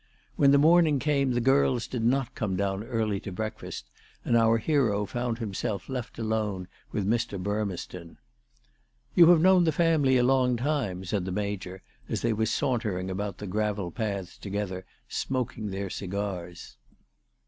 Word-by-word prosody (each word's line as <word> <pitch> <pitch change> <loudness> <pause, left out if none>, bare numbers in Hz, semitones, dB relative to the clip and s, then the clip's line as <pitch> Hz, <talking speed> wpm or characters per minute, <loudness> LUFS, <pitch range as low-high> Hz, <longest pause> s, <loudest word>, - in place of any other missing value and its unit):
When 140 - +5
the 140 - +6
morning 160 0 +5
came 140 -2 +1
the 120 - +1
girls 130 -1 +3
did 125 -3 -4
not 130 +1 +1
come 100 -4 -2
down 100 +1 -1
early 110 -4 -1
to 100 - -7
breakfast, 95 - -5 0.4
and 120 - +2
our 115 0 +4
hero 115 -6 +1
found 120 +2 -2
himself 100 -3 -3
left 125 -2 -5
alone 110 -5 -2 0.2
with 100 - -1
Mr. 115 -2 0
Burmeston. 90 -4 -4 0.5
" - - -41
You 170 - +8
have 175 -3 +6
known 185 0 +6
the 160 - +3
family 150 -5 +3
a 125 - +3
long 125 -1 +3
time," 120 -9 -1
said 95 0 -1
the 95 - -3
Major 95 -2 -4 0.3
as - - -2
they 115 -1 +2
were 110 +1 0
sauntering 105 -6 -1
about 100 0 -3
the 105 - -7
gravel 105 -2 -2
paths 100 -6 -4
together, 100 -2 -4 0.2
smoking 125 -4 -3
their 95 -1 -4
cigars. 90 -8 -5
110 Hz, 160 wpm, -27 LUFS, 95-130 Hz, 0.5 s, You